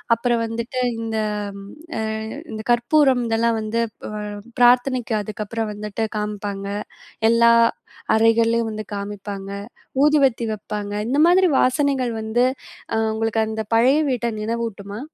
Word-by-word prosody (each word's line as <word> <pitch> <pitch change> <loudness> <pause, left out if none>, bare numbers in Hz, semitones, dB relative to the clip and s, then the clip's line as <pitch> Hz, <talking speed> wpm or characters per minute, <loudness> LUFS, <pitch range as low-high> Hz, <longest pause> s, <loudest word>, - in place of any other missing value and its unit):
அப்புறம் 235 0 0
வந்துட்டு 235 +3 -3 0.2
இந்த 225 -1 -3 0.4
ம் 200 +1 -11 0.3
அ - - -1 0.5
இந்த 215 0 -5
கற்பூரம் 255 +1 +3
இதெல்லாம் 230 0 +1
வந்து 220 +2 -1 0.2
ப் - - -6 0.5
பிரார்த்தனைக்கு 245 -1 +4
அதுக்கப்புறம் 215 +1 -4
வந்துட்டு 210 +1 -3
காம்ப்பாங்க. 205 -1 -4 0.7
எல்லா 235 0 +6 0.6
அறைகள்லேயும் 225 +1 +3
வந்து 215 0 -5
காமிப்பாங்க. 200 -1 -6 0.5
ஊதுவத்தி 280 -5 +3
வெப்பாங்க. 205 -1 -5 0.2
இந்த 280 +3 +1
மாதிரி 365 +1 +5
வாசனைகள் 260 -2 +1
வந்து 220 +3 +1 0.5
அ - - +1 0.2
உங்களுக்கு 225 0 0
அந்த 220 0 -3
பழைய 255 +6 +5
வீட்ட 245 -2 -1
நினைவூட்டுமா? 215 -2 -4
225 Hz, 120 wpm, -22 LUFS, 215-245 Hz, 0.7 s, எல்லா